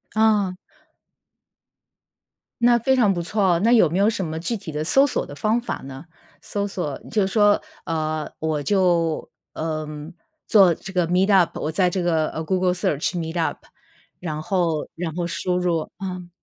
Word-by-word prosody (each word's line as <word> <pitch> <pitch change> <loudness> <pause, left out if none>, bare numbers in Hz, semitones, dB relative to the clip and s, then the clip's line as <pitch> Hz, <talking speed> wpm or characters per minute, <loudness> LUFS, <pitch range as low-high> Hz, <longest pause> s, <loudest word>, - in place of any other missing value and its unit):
哦。 210 -4 +3 2.1
那 240 0 +6
非 265 +3 +2
常 215 -6 +4
不 175 -2 -1
错， 190 -2 +2
那 230 +3 +3
有 220 -9 +5
没 170 - -2
有 200 +2 +4
什 210 -4 -2
么 160 0 -4
具 230 +8 -2
体 190 -6 -7
的 150 +1 -3
搜 270 - +4
索 - - -2
的 145 - -10
方 215 +10 +1
法 240 - -4
呢？ 135 +3 -9 0.4
搜 205 +3 -3
索 175 -8 -4
就 210 -3 +1
是 - - -1
说， 205 -2 +4 0.3
呃， 155 -2 -2
我 155 -2 -1
就， 175 -3 +1 0.3
呃， 155 -1 -3 0.6
做 195 -5 +6
这 190 +4 -10
个 175 -2 +1
Meetup， 185 0 +3
我 155 - -2
在 180 +2 +2
这 180 0 -2
个， 160 -3 +1
呃 160 - -5
，Google 185 +1 +1
search 155 -2 -1
Meetup， 165 0 -2 0.6
然 155 -4 -4
后 165 -2 -1
然 165 -1 -3
后 175 -1 -1
输 180 +1 -1
入 170 -3 -1
嗯， 180 -2 -5
180 Hz, 250 characters per minute, -23 LUFS, 160-200 Hz, 2.1 s, 那